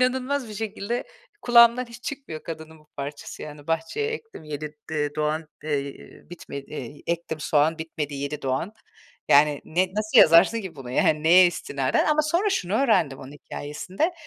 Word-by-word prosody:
inanılmaz 255 Hz, +1 st, 0 dB
bir 215 Hz, -, -8 dB
şekilde 220 Hz, +2 st, -3 dB, 0.4 s
kulağımdan 240 Hz, +1 st, +6 dB
hiç 235 Hz, +1 st, -13 dB
çıkmıyor 265 Hz, -, -6 dB
kadının 160 Hz, -1 st, -8 dB
bu 150 Hz, -, -25 dB
parçası. 140 Hz, +1 st, -7 dB
Yani, 150 Hz, -1 st, -10 dB
"Bahçeye 165 Hz, -, -1 dB
ektim 450 Hz, -, -8 dB
7 150 Hz, 0 st, -6 dB, 0.2 s
d 150 Hz, -2 st, -1 dB
doğan, 155 Hz, +1 st, -1 dB, 0.2 s
eee, 140 Hz, -2 st, -4 dB
bitmedi. 140 Hz, -4 st, -8 dB
Ektim 170 Hz, -2 st, -3 dB
soğan, 155 Hz, +2 st, +2 dB
bitmedi 155 Hz, -3 st, -4 dB
7 140 Hz, +2 st, -4 dB
doğan." 135 Hz, +9 st, -1 dB, 0.6 s
Yani, 145 Hz, 0 st, +5 dB
ne, 180 Hz, +4 st, +1 dB
nasıl 215 Hz, 0 st, +3 dB
yazarsın 170 Hz, +8 st, +7 dB
ki 185 Hz, -6 st, -8 dB
bunu? 130 Hz, -3 st, -8 dB
Yani, 150 Hz, +4 st, +2 dB
neye 180 Hz, +3 st, +7 dB
istinaden? 140 Hz, -6 st, 0 dB
Ama 305 Hz, 0 st, +3 dB
sonra 345 Hz, +7 st, +1 dB
şunu 195 Hz, -, -1 dB
öğrendim 215 Hz, -, +2 dB
onun 135 Hz, +1 st, -10 dB
hikâyesinde. 180 Hz, -, -4 dB
160 Hz, 155 wpm, -25 LUFS, 150-225 Hz, 0.6 s, yazarsın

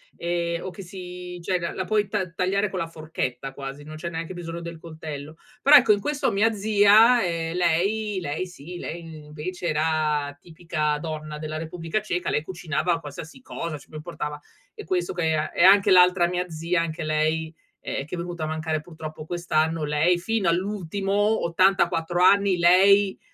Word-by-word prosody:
e 170 Hz, 0 st, -2 dB
o -, -, -5 dB
che 185 Hz, +2 st, -10 dB
si 180 Hz, -1 st, -8 dB
cioè 180 Hz, +1 st, 0 dB
la 170 Hz, -1 st, -3 dB
la 185 Hz, -, -3 dB
puoi 210 Hz, -1 st, +1 dB
ta 190 Hz, -2 st, -2 dB
tagliare 195 Hz, +4 st, 0 dB
con 190 Hz, -, -4 dB
la 165 Hz, -, -2 dB
forchetta 155 Hz, -5 st, -4 dB
quasi, 140 Hz, +1 st, -7 dB
non 155 Hz, +1 st, -9 dB
c'è 170 Hz, +2 st, -5 dB
neanche 165 Hz, +1 st, -5 dB
bisogno 170 Hz, -1 st, -6 dB
del 170 Hz, 0 st, -7 dB
coltello. 155 Hz, -2 st, -8 dB, 0.3 s
Però 290 Hz, +2 st, +7 dB
ecco 245 Hz, -6 st, +7 dB
in 205 Hz, -, +4 dB
questo 290 Hz, +1 st, -1 dB
mia 220 Hz, +3 st, +2 dB
zia, 215 Hz, +3 st, +5 dB
ehm, 165 Hz, -2 st, -2 dB
lei 190 Hz, +4 st, +1 dB
lei 155 Hz, +4 st, -3 dB
sì 175 Hz, 0 st, -10 dB
lei 170 Hz, 0 st, -6 dB, 0.2 s
invece 160 Hz, +5 st, -6 dB
era 150 Hz, -2 st, 0 dB
tipica 160 Hz, -2 st, -2 dB
donna 155 Hz, -1 st, -5 dB
della 155 Hz, 0 st, -5 dB
Repubblica 165 Hz, +4 st, -3 dB
Ceca, 180 Hz, -4 st, -3 dB
lei 150 Hz, -, 0 dB
cucinava 170 Hz, 0 st, -1 dB
qualsiasi 155 Hz, -, -9 dB
cosa, 170 Hz, -, -5 dB
ci 145 Hz, -, -18 dB
pre 155 Hz, -, -8 dB
portava 150 Hz, -2 st, -5 dB, 0.3 s
e -, -, -9 dB
questo 180 Hz, 0 st, -1 dB
che 165 Hz, -3 st, 0 dB
e 155 Hz, 0 st, -1 dB
e -, -, +2 dB
anche 195 Hz, +1 st, +7 dB
l'altra 180 Hz, -1 st, +6 dB
mia 180 Hz, 0 st, -2 dB
zia 165 Hz, +2 st, -1 dB
anche 165 Hz, 0 st, -4 dB
lei, 155 Hz, +1 st, 0 dB, 0.3 s
ehm, 135 Hz, -, -4 dB
che 155 Hz, -, -6 dB
è -, -, -7 dB
venuta 170 Hz, -1 st, -5 dB
a -, -, -3 dB
mancare 155 Hz, 0 st, -2 dB
purtroppo 155 Hz, -1 st, -9 dB
quest'anno. 160 Hz, -2 st, 0 dB
Lei 150 Hz, +4 st, +2 dB
fino 205 Hz, +2 st, -1 dB
all'ultimo, 195 Hz, +2 st, -1 dB, 0.3 s
84 175 Hz, -1 st, +2 dB
anni 200 Hz, 0 st, +5 dB
lei 190 Hz, +3 st, +5 dB
170 Hz, 180 wpm, -24 LUFS, 155-185 Hz, 0.3 s, Però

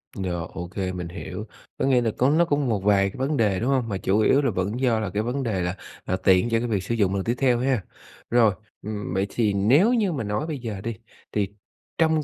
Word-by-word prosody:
Rồi, 85 Hz, -3 st, -3 dB
ô 90 Hz, -1 st, -5 dB
kê, 95 Hz, 0 st, -3 dB
mình 90 Hz, -2 st, -5 dB
hiểu. 95 Hz, +4 st, -7 dB, 0.3 s
Có -, -, 0 dB
nghĩa 130 Hz, -2 st, +4 dB
là 115 Hz, -2 st, 0 dB
có 130 Hz, +2 st, +3 dB
nó 165 Hz, +3 st, +4 dB
có 145 Hz, -3 st, +1 dB
một 120 Hz, -8 st, 0 dB
vài 100 Hz, -1 st, +4 dB
cái -, -, -11 dB
vấn 135 Hz, +3 st, 0 dB
đề, 100 Hz, -4 st, +2 dB
đúng 120 Hz, +4 st, 0 dB
hông? 125 Hz, -4 st, +1 dB
Mà 100 Hz, -, -1 dB
chủ 95 Hz, +3 st, +1 dB
yếu 135 Hz, +6 st, +4 dB
là 135 Hz, -5 st, +1 dB
vẫn 100 Hz, +6 st, -2 dB
do 120 Hz, -4 st, +2 dB
là 105 Hz, -4 st, -2 dB
cái 105 Hz, +3 st, -1 dB
vấn 130 Hz, +3 st, -2 dB
đề 100 Hz, -6 st, -1 dB
là 90 Hz, +1 st, -2 dB, 0.3 s
là 95 Hz, -, 0 dB
tiện 95 Hz, +4 st, +3 dB
cho 115 Hz, 0 st, +2 dB
cái 120 Hz, -, -2 dB
việc 100 Hz, -5 st, -1 dB
sử 115 Hz, +4 st, -2 dB
dụng 100 Hz, -3 st, +1 dB
lần 95 Hz, -, -1 dB
tiếp 120 Hz, +2 st, 0 dB
theo 125 Hz, -3 st, +2 dB
ha. 125 Hz, -6 st, +1 dB, 0.5 s
Rồi, 115 Hz, -4 st, +4 dB, 0.3 s
ừm, 105 Hz, -3 st, -5 dB
vậy 95 Hz, +1 st, 0 dB
thì 110 Hz, -4 st, +1 dB
nếu 140 Hz, -, +4 dB
như 210 Hz, -6 st, +2 dB
mà 135 Hz, -7 st, -2 dB
nói 105 Hz, +10 st, -2 dB
bây 150 Hz, -4 st, -4 dB
giờ 110 Hz, -5 st, -5 dB
đi, 115 Hz, +1 st, -4 dB, 0.4 s
thì 100 Hz, -2 st, 0 dB, 0.5 s
trong 160 Hz, -2 st, +3 dB
110 Hz, 260 wpm, -24 LUFS, 95-130 Hz, 0.5 s, nghĩa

